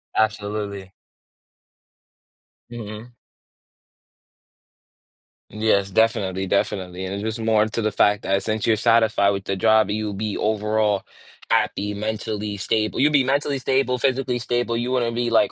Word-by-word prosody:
Absolutely. 105 Hz, -2 st, -2 dB, 1.8 s
Mhm. 115 Hz, 0 st, -8 dB, 2.4 s
Yes. 105 Hz, -2 st, +1 dB
Definitely, 95 Hz, -3 st, +1 dB
definitely, 95 Hz, -2 st, -1 dB
and 95 Hz, +1 st, -4 dB
it 100 Hz, -, -3 dB
just 110 Hz, +1 st, -3 dB
more 110 Hz, -1 st, +2 dB
into 110 Hz, +1 st, -2 dB
the 110 Hz, 0 st, 0 dB
fact 105 Hz, 0 st, +2 dB
that 100 Hz, 0 st, +1 dB
since 110 Hz, -1 st, -2 dB
you're 110 Hz, -1 st, +3 dB
satisfied 110 Hz, -2 st, +3 dB
with 100 Hz, -1 st, -3 dB
the 95 Hz, -, -1 dB
job, 110 Hz, 0 st, +4 dB
you'll 105 Hz, 0 st, -2 dB
be 105 Hz, +1 st, -3 dB
overall 105 Hz, -1 st, 0 dB, 0.5 s
happy, 105 Hz, -2 st, +1 dB
mentally 105 Hz, 0 st, -3 dB
stable 110 Hz, +2 st, -1 dB
you'll 150 Hz, +2 st, +4 dB
be 140 Hz, -3 st, +3 dB
mentally 140 Hz, +1 st, 0 dB
stable, 130 Hz, -1 st, +1 dB
physically 130 Hz, 0 st, 0 dB
stable, 120 Hz, -1 st, -1 dB
you 120 Hz, +1 st, -2 dB
wouldn't 120 Hz, -2 st, 0 dB
be, 120 Hz, 0 st, -1 dB
like, 120 Hz, +2 st, +3 dB
110 Hz, 135 wpm, -22 LUFS, 100-115 Hz, 2.4 s, job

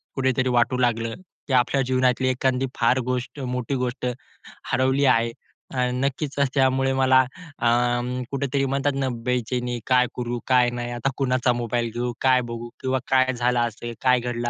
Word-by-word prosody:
कुठेतरी 130 Hz, -1 st, +1 dB
वाटू 125 Hz, +1 st, +2 dB
लागलं, 115 Hz, -2 st, 0 dB, 0.3 s
की 135 Hz, -, -2 dB
आपल्या 130 Hz, +2 st, +3 dB
जीवनातली 130 Hz, 0 st, +2 dB
एखादी 130 Hz, 0 st, 0 dB
फार 120 Hz, +2 st, +2 dB
गोष्ट 125 Hz, +2 st, -3 dB
मोठी 125 Hz, 0 st, -2 dB
गोष्ट 125 Hz, 0 st, -3 dB, 0.7 s
हरवली 130 Hz, +2 st, +2 dB
आहे. 115 Hz, -3 st, +3 dB, 0.4 s
अ, -, -, -5 dB, 0.2 s
नक्कीच, 140 Hz, +3 st, -2 dB, 0.2 s
त्यामुळे 135 Hz, -1 st, +2 dB
मला 130 Hz, 0 st, +4 dB, 0.4 s
अ, 120 Hz, -, +1 dB, 0.6 s
कुठेतरी 140 Hz, 0 st, 0 dB
म्हणतात 140 Hz, +1 st, 0 dB
ना, 135 Hz, -1 st, 0 dB, 0.2 s
बेचैनी 125 Hz, 0 st, -1 dB
काय 125 Hz, -1 st, +4 dB
करू, 120 Hz, -1 st, -3 dB
काय 125 Hz, -2 st, +4 dB
नाही 120 Hz, 0 st, -4 dB
आता 120 Hz, +3 st, -1 dB
कुणाचा 130 Hz, -2 st, +1 dB
मोबाईल 120 Hz, 0 st, -1 dB
घेऊ, 120 Hz, +1 st, -2 dB
काय 130 Hz, -1 st, +4 dB
बघू 115 Hz, 0 st, -6 dB
किंवा 130 Hz, 0 st, 0 dB
काय 130 Hz, 0 st, +3 dB
झालं 125 Hz, 0 st, +1 dB
असेल? 120 Hz, 0 st, -3 dB
काय 125 Hz, -1 st, +4 dB
घडलं 120 Hz, 0 st, -3 dB
125 Hz, 155 wpm, -24 LUFS, 120-130 Hz, 0.7 s, मला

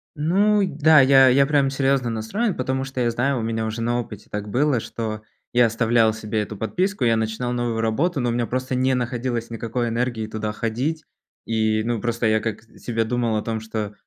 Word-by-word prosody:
Ну 200 Hz, +7 st, +2 dB
и 190 Hz, -, +1 dB
да, 155 Hz, -1 st, +5 dB
я 135 Hz, 0 st, +6 dB
я 140 Hz, +2 st, +5 dB
прям 140 Hz, -2 st, +2 dB
серьезно 135 Hz, -3 st, +1 dB
настроен, 180 Hz, -, -2 dB
потому 130 Hz, +1 st, -2 dB
что 135 Hz, -1 st, -4 dB
я 120 Hz, -, +2 dB
знаю, 125 Hz, +2 st, 0 dB
у -, -, -2 dB
меня 110 Hz, 0 st, -2 dB
уже 110 Hz, +1 st, -4 dB
на 120 Hz, +1 st, 0 dB
опыте 105 Hz, -4 st, -8 dB
так 105 Hz, 0 st, -4 dB
было, 130 Hz, +4 st, +1 dB
что 110 Hz, -1 st, -5 dB, 0.3 s
я 120 Hz, 0 st, +5 dB
оставлял 115 Hz, 0 st, +2 dB
себе 110 Hz, 0 st, -3 dB
эту 105 Hz, 0 st, -5 dB
подписку, 185 Hz, -, -1 dB
я 115 Hz, -1 st, +3 dB
начинал 110 Hz, +2 st, -2 dB
новую 120 Hz, -2 st, -1 dB
работу, 140 Hz, +9 st, 0 dB
но 120 Hz, -1 st, 0 dB
у -, -, 0 dB
меня 120 Hz, 0 st, 0 dB
просто 130 Hz, +1 st, -2 dB
не 130 Hz, +1 st, +2 dB
находилось 120 Hz, -1 st, -2 dB
никакой 115 Hz, +1 st, -3 dB
энергии 115 Hz, -2 st, -2 dB
туда 110 Hz, 0 st, -4 dB
ходить. 125 Hz, +9 st, -2 dB, 0.4 s
И, 110 Hz, -1 st, +1 dB
ну, 115 Hz, -1 st, -1 dB
просто 120 Hz, +1 st, -2 dB
я 110 Hz, 0 st, +3 dB
как 110 Hz, -1 st, -4 dB
с 115 Hz, -, -21 dB
себе 115 Hz, -2 st, 0 dB
думал 120 Hz, -1 st, 0 dB
о -, -, -1 dB
том, 110 Hz, 0 st, -3 dB
что 110 Hz, -2 st, -5 dB
120 Hz, 215 wpm, -22 LUFS, 110-130 Hz, 0.4 s, я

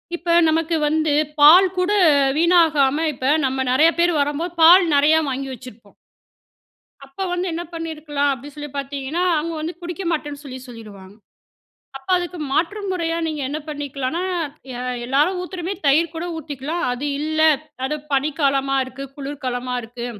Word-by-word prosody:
இப்ப 340 Hz, 0 st, 0 dB
நமக்கு 325 Hz, +1 st, 0 dB
வந்து 310 Hz, 0 st, +1 dB, 0.3 s
பால் 335 Hz, +6 st, +8 dB
கூட 365 Hz, +2 st, +1 dB, 0.5 s
வீணாகாம 320 Hz, -3 st, +3 dB
இப்ப 265 Hz, +3 st, +1 dB
நம்ம 265 Hz, 0 st, -1 dB
நெறைய 300 Hz, +6 st, +5 dB
பேர் 345 Hz, 0 st, +3 dB
வரும்போது, 295 Hz, +5 st, -2 dB
பால் 350 Hz, +3 st, +8 dB
நெறையா 295 Hz, +3 st, +4 dB
வாங்கி 270 Hz, +1 st, -3 dB
வச்சிருப்போம். 235 Hz, -4 st, -13 dB, 1.1 s
அப்ப 275 Hz, +8 st, -5 dB
வந்து 355 Hz, +1 st, -1 dB
என்ன 340 Hz, +1 st, -3 dB
பண்ணியிருக்கலாம் 310 Hz, -3 st, -2 dB
அப்டின்னு 275 Hz, +2 st, -7 dB
சொல்லி 295 Hz, 0 st, -7 dB
பார்த்தீங்கன்னா, 280 Hz, +4 st, -3 dB
அவங்க 330 Hz, +2 st, -3 dB
வந்து 325 Hz, +3 st, -4 dB
குடிக்க 350 Hz, +2 st, -6 dB
மாட்டேன்னு 295 Hz, -3 st, -4 dB
சொல்லி 260 Hz, -2 st, -8 dB
சொல்லிருவாங்க. 205 Hz, -5 st, -12 dB, 0.8 s
அப்ப 270 Hz, -, -13 dB
அதுக்கு 355 Hz, 0 st, -4 dB
மாற்றும் 390 Hz, +7 st, -1 dB
முறையா 335 Hz, -2 st, -2 dB
நீங்க 310 Hz, -2 st, -4 dB
என்ன 295 Hz, +2 st, -3 dB
பண்ணிக்கலானா 285 Hz, 0 st, -4 dB, 0.5 s
எ -, -, -7 dB, 0.3 s
எல்லாரும் 295 Hz, +9 st, +1 dB
ஊத்துறமே 360 Hz, 0 st, -5 dB
தயிர் 310 Hz, +4 st, +3 dB
கூட 325 Hz, +1 st, -4 dB
ஊத்திக்கலாம் 300 Hz, +2 st, -5 dB
அது 250 Hz, +4 st, -3 dB
இல்ல 310 Hz, +1 st, -2 dB, 0.4 s
அது 280 Hz, +3 st, -1 dB, 0.2 s
பனிக்காலமா 275 Hz, -1 st, +1 dB
இருக்கு, 265 Hz, +1 st, -8 dB
குளிர்காலமா 260 Hz, -3 st, -4 dB
இருக்கு 235 Hz, +1 st, -7 dB
295 Hz, 145 wpm, -21 LUFS, 270-330 Hz, 1.1 s, பால்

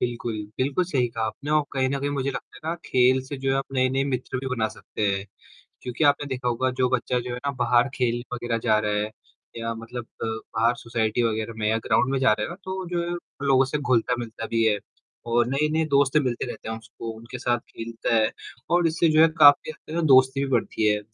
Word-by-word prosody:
बिल्कुल, 120 Hz, -1 st, -2 dB, 0.2 s
बिल्कुल 140 Hz, +7 st, +1 dB
सही 135 Hz, -8 st, 0 dB
कहा 115 Hz, -1 st, -3 dB
आपने 140 Hz, +7 st, -6 dB
और 155 Hz, 0 st, +4 dB
कहीं 130 Hz, -1 st, +1 dB
न 140 Hz, +1 st, -1 dB
कहीं 140 Hz, +1 st, -1 dB
मुझे 140 Hz, -1 st, -1 dB
लगता -, -, -8 dB
है 155 Hz, -, -7 dB
ना -, -, -1 dB
खेल 130 Hz, +1 st, +4 dB
से 140 Hz, +1 st, -6 dB
जो 135 Hz, 0 st, -1 dB
है 135 Hz, -, +2 dB
आप 135 Hz, -, -1 dB
नए-नए 130 Hz, 0 st, +2 dB
मित्र 130 Hz, -1 st, -3 dB
भी 135 Hz, -, -5 dB
बना 110 Hz, -3 st, 0 dB
सकते 110 Hz, -, -8 dB
हैं। 100 Hz, -1 st, 0 dB, 0.6 s
क्योंकि 125 Hz, +5 st, -2 dB
आपने 145 Hz, 0 st, +3 dB
देखा 130 Hz, -2 st, -2 dB
होगा 130 Hz, +2 st, +1 dB
जो 125 Hz, -, +4 dB
बच्चा 125 Hz, 0 st, 0 dB
जो 125 Hz, +1 st, -6 dB
है -, -, -5 dB
ना -, -, +2 dB
बाहर 120 Hz, +2 st, +4 dB
खेलने 120 Hz, -1 st, 0 dB
वगैरह 120 Hz, -1 st, -2 dB
जा 110 Hz, -3 st, +4 dB
रहा 105 Hz, 0 st, -1 dB
है, 105 Hz, +1 st, -1 dB, 0.5 s
या 115 Hz, 0 st, -3 dB
मतलब 115 Hz, +1 st, -7 dB, 0.2 s
बाहर 110 Hz, +1 st, 0 dB
सोसाइटी 115 Hz, -1 st, -1 dB
वगैरह 110 Hz, 0 st, -1 dB
में 105 Hz, -1 st, 0 dB
या 110 Hz, +1 st, +2 dB
ग्राउंड 135 Hz, -, +3 dB
में 135 Hz, -, +1 dB
जा 130 Hz, -4 st, +4 dB
रहा 105 Hz, -, -1 dB
है -, -, -4 dB
ना। 170 Hz, -, -7 dB
तो 190 Hz, 0 st, -4 dB
जो 175 Hz, -1 st, -1 dB
है 170 Hz, -, -3 dB
वो 170 Hz, -4 st, -9 dB
लोगों 135 Hz, -1 st, +5 dB
से 140 Hz, +3 st, -2 dB
घुलता-मिलता 120 Hz, -4 st, -1 dB
भी 115 Hz, 0 st, +1 dB
है 105 Hz, -2 st, +3 dB, 0.5 s
और 120 Hz, 0 st, +4 dB
नए-नए 150 Hz, +4 st, +1 dB
दोस्त 140 Hz, 0 st, +3 dB
मिलते 130 Hz, -5 st, +1 dB
रहते 120 Hz, -, -7 dB
हैं 110 Hz, 0 st, -4 dB
उसको, 115 Hz, +1 st, -8 dB
उनके 115 Hz, +3 st, -8 dB
साथ 120 Hz, 0 st, +1 dB
खेलता 115 Hz, +1 st, -3 dB
है 110 Hz, -1 st, +3 dB, 0.4 s
और 175 Hz, 0 st, +4 dB
इससे 165 Hz, +1 st, +2 dB
जो 155 Hz, 0 st, +4 dB
है 165 Hz, -, +7 dB
काफ़ी 145 Hz, 0 st, +7 dB
हद 155 Hz, -, -9 dB, 0.2 s
तक -, -, +2 dB
दोस्ती 130 Hz, 0 st, +5 dB
भी 135 Hz, -, -4 dB
बढ़ती 115 Hz, -3 st, +1 dB
है 105 Hz, 0 st, +2 dB
125 Hz, 235 wpm, -25 LUFS, 115-140 Hz, 0.6 s, है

